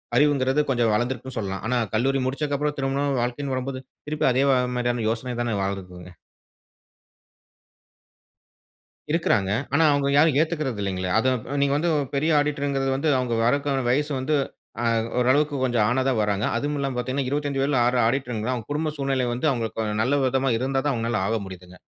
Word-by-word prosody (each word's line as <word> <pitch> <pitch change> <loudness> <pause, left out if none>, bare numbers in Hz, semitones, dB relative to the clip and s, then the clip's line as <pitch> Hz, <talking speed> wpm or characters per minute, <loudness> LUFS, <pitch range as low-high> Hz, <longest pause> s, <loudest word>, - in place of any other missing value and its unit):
அறிவுங்கறது 140 0 +3
கொஞ்சம் 120 -4 +2
வளர்ந்திருக்குனு 125 +2 -3
சொல்லலாம். 95 -2 -4
ஆனா 125 +1 +1 0.2
கல்லூரி 135 +4 +1
முடிச்சதுக்கு 140 +2 -1
அப்புறம் 150 +1 -1
திருமணம், 140 0 0
வாழ்க்கைன்னு 130 +3 -2
வரம்போது, 130 0 -4 0.3
திருப்பி 150 0 -1
அதே 130 +2 +2 0.3
மாரியான 120 -2 -1
யோசனை 120 +2 -3
தானே 120 -3 -1
வாழுதுங்க. 90 -2 -6 3.0
இருக்கிறாங்க. 115 - +1 0.2
ஆனா 160 +3 +4
அவங்க 140 -1 +1
யாரும் 150 -1 +4
ஏத்துக்கறது 155 -8 -2
இல்லீங்களே. 95 -2 -2
அதை 130 +4 +3 0.3
நீங்க 140 0 +2
வந்து 170 +3 0 0.3
பெரிய 155 +4 +1
ஆடிட்டர்ங்கறது 140 -2 -1
வந்து 145 +4 0 0.3
வறதுக்கான 140 +2 +1
வயசு 145 +4 +1
வந்து 145 +4 0 0.5
அ - - 0 0.3
ஓரளவுக்கு 145 +4 +2
கொஞ்சம் 120 -4 +2
ஆனா 130 +2 +1
தான் 130 -3 +1
வர்றாங்க. 105 -1 0
அதுவும் 145 +5 -1
இல்லாமல 135 -2 -2
பார்த்தீங்கன்னா, 130 +2 -2
25 145 -1 -1
வயதில 140 0 +1
ஆ - - +3 0.2
ஆடிட்டர்ங்கிறான். 125 -2 -1
அவங்க 115 -3 -7
குடும்ப 155 +2 -1
சூழ்நிலை 135 -2 0
வந்து, 125 +5 -3
அவங்களுக்கு 110 -3 -2
நல்ல 130 +6 +2
விதமா 135 +1 +1
இருந்தா 135 +3 0
தான் 145 - +2
அவங்களால 115 -3 -1
ஆக 115 +1 0
முடியுதுங்க. 90 -1 -11
130 Hz, 155 wpm, -24 LUFS, 115-140 Hz, 3.0 s, ஆனா